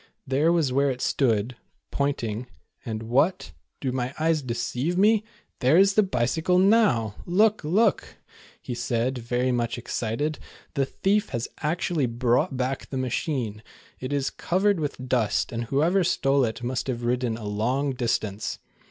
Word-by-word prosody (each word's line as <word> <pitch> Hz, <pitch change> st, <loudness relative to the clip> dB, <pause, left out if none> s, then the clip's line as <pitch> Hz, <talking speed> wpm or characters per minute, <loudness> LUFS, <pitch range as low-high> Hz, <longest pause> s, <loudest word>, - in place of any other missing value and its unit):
There 145 Hz, +5 st, +2 dB
was 160 Hz, -7 st, +1 dB
where 140 Hz, +1 st, +3 dB
it 125 Hz, -2 st, -3 dB
stood 120 Hz, -3 st, +1 dB, 0.3 s
[pointing], 125 Hz, -4 st, -2 dB, 0.4 s
and 110 Hz, -1 st, -4 dB
what? 135 Hz, +11 st, +1 dB, 0.3 s
Do 130 Hz, -, -2 dB
my 130 Hz, +1 st, -3 dB
eyes 160 Hz, -1 st, +2 dB
deceive 130 Hz, +6 st, -2 dB
me? 215 Hz, +2 st, +4 dB, 0.4 s
TJiere 140 Hz, +7 st, +5 dB
is 195 Hz, 0 st, +5 dB
the 215 Hz, -, +5 dB
bicycle, 160 Hz, -, +1 dB
noiu!! 185 Hz, -, +4 dB
Look, 210 Hz, +4 st, +3 dB
look," 200 Hz, +8 st, +1 dB, 0.4 s
he -, -, -6 dB
said, 120 Hz, +1 st, -1 dB
very 125 Hz, +2 st, 0 dB
much 120 Hz, -1 st, -1 dB
excited, 120 Hz, +5 st, -2 dB, 0.3 s
"the 135 Hz, -1 st, 0 dB
thief 205 Hz, +8 st, 0 dB
has 120 Hz, 0 st, -3 dB
actually 160 Hz, -2 st, 0 dB
brought 125 Hz, +5 st, +1 dB
back 130 Hz, +1 st, -2 dB
the 135 Hz, -, -4 dB
machine. 125 Hz, -4 st, -2 dB, 0.4 s
It 130 Hz, +2 st, -5 dB
is 140 Hz, -2 st, 0 dB
covered 195 Hz, +1 st, +1 dB
with 140 Hz, -4 st, -4 dB
dust, 115 Hz, -5 st, +1 dB
and 115 Hz, 0 st, -3 dB
whoever 160 Hz, +10 st, +2 dB
stole 140 Hz, -6 st, +2 dB
it 115 Hz, +2 st, -5 dB
must 125 Hz, +2 st, -2 dB
have 120 Hz, -2 st, -3 dB
ridden 120 Hz, -1 st, 0 dB
a 110 Hz, -, -8 dB
long 125 Hz, +7 st, 0 dB
distance." 110 Hz, -4 st, -2 dB
130 Hz, 150 wpm, -25 LUFS, 120-160 Hz, 0.4 s, TJiere